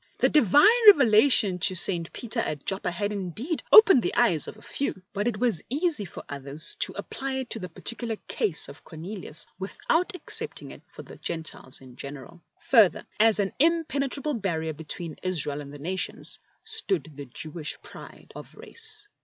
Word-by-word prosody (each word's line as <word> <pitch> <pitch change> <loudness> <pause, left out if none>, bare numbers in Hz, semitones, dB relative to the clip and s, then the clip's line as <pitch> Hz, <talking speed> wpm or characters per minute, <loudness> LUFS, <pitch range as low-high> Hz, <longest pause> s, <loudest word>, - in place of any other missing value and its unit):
The - - +3
Divine 390 - +5
revelation 225 - +6
to 185 +2 +3
St. 170 -2 +3
Peter 235 0 -4
at 150 -10 -3
Joppa 190 -2 -1
had 205 +4 -3
indeed 210 - -4
opened 395 - +9
the - - -2
eyes 190 -11 +2
of - - -9
a - - -16
few; 230 -9 -4
but 205 +2 -1
it 235 -3 -1
was 230 -6 +1
easy 295 - 0
for 170 - -10
others 145 +2 -6
to - - +1
apply 270 0 -5
it 265 -2 -4
to 225 - -2
the 180 -2 -6
particular 230 +6 -4
case 170 -6 -1
of 140 +2 -12
Cornelius 170 0 -7
without 330 - -1
accepting - - -4
it - - -12
for - - -10
the - - -13
Gentiles 160 -6 -5
in 130 -1 -15
general. 145 +5 -9 0.2
Further, 225 -8 +4
as 225 0 +5
an 200 -2 -1
impenetrable 295 -3 +1
barrier 165 - -2
between 160 +1 -6
Israel 150 -5 -1
and 140 -1 -9
the 145 - -9
nations, 180 +6 -4 0.2
stood 440 - 0
the 145 0 -8
Jewish 155 +5 -7
pride - - -13
of - - -11
race. 440 -2 -6
200 Hz, 170 wpm, -26 LUFS, 160-270 Hz, 0.2 s, opened